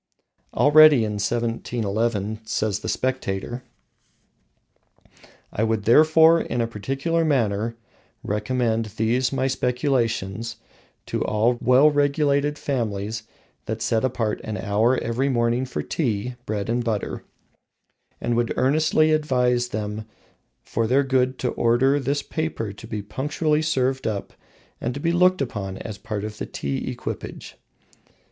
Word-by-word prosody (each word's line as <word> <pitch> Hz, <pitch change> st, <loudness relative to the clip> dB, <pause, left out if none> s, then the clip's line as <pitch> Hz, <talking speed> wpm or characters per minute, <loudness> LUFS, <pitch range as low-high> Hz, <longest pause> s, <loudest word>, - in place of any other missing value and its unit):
Already 150 Hz, -3 st, +7 dB
in 105 Hz, -1 st, -3 dB
1711, 115 Hz, -2 st, -1 dB
says 110 Hz, -2 st, -1 dB
the -, -, -5 dB
Spectator: 120 Hz, -2 st, -2 dB, 1.9 s
"I 105 Hz, -, 0 dB
would 110 Hz, -2 st, 0 dB
therefore 160 Hz, +6 st, +6 dB
in 120 Hz, -, -3 dB
a 115 Hz, -, +2 dB
particular 135 Hz, +9 st, -1 dB
manner 115 Hz, -6 st, 0 dB, 0.5 s
recommend 115 Hz, +2 st, 0 dB
these 125 Hz, +3 st, +1 dB
my 135 Hz, -1 st, 0 dB
speculations 120 Hz, -5 st, -1 dB, 0.5 s
to -, -, -2 dB
all 115 Hz, +3 st, +1 dB
well 130 Hz, +4 st, +5 dB
regulated 145 Hz, 0 st, +1 dB
families 110 Hz, -5 st, -3 dB, 0.4 s
that -, -, -3 dB
set 110 Hz, +1 st, 0 dB
apart 115 Hz, -4 st, -1 dB
an 110 Hz, -1 st, -4 dB
hour 110 Hz, +4 st, +2 dB
every 125 Hz, +4 st, -1 dB
morning 120 Hz, 0 st, +1 dB
for 125 Hz, -, -4 dB
tea, 120 Hz, -5 st, -2 dB
bread 105 Hz, -2 st, -2 dB
and 120 Hz, +1 st, 0 dB
butter; 110 Hz, -3 st, -3 dB, 1.0 s
and 120 Hz, -, -1 dB
would 120 Hz, 0 st, 0 dB
earnestly 155 Hz, +4 st, +3 dB
advise 125 Hz, -5 st, +2 dB
them 105 Hz, -2 st, -4 dB, 0.6 s
for 115 Hz, 0 st, -1 dB
their 135 Hz, +4 st, +3 dB
good 130 Hz, -1 st, +1 dB
to 125 Hz, -, -1 dB
order 130 Hz, +5 st, +2 dB
this 140 Hz, +2 st, -1 dB
paper 155 Hz, -10 st, -3 dB
to 100 Hz, -, -11 dB
be 105 Hz, -1 st, -4 dB
punctually 150 Hz, +7 st, -1 dB
served 130 Hz, -4 st, 0 dB
up 105 Hz, -3 st, -4 dB, 0.5 s
and 120 Hz, +2 st, -2 dB
to -, -, -4 dB
be 165 Hz, +3 st, 0 dB
looked 180 Hz, -1 st, +3 dB
upon 100 Hz, -6 st, -5 dB
as 105 Hz, -1 st, -7 dB
a -, -, -29 dB
part 105 Hz, -3 st, -4 dB
of 105 Hz, 0 st, -6 dB
the -, -, -4 dB
tea 70 Hz, -1 st, -3 dB
equipage." -, -, -6 dB
120 Hz, 135 wpm, -23 LUFS, 110-135 Hz, 1.9 s, Already